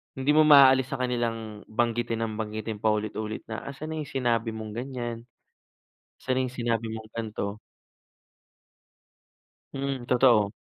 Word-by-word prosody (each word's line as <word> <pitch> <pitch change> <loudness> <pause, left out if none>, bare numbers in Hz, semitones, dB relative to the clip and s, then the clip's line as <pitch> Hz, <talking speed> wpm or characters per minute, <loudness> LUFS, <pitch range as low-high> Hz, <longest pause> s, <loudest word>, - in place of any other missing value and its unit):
hindi 135 +2 +1
mo 155 - +7
maaalis 135 -3 +8
sa 135 - -1
kanilang 115 -4 -2
banggitin 115 0 0
ng 110 - -3
banggitin, 110 0 -4
paulit-ulit 110 0 -1
na, 110 0 -4
"Asaan 150 +3 -6
na - - -3
yung - - -11
sinabi 120 -3 0
mong 110 -1 -6
ganiyan? 120 -2 -5 1.0
Saan 130 0 0
na 130 - +1
yung 125 - -8
sinabi 115 -2 -1
mong 110 0 -9
ganito?" 105 -2 -4 2.2
Mm, 135 -3 -3
totoo. 120 -5 +4
115 Hz, 135 wpm, -27 LUFS, 110-130 Hz, 2.2 s, maaalis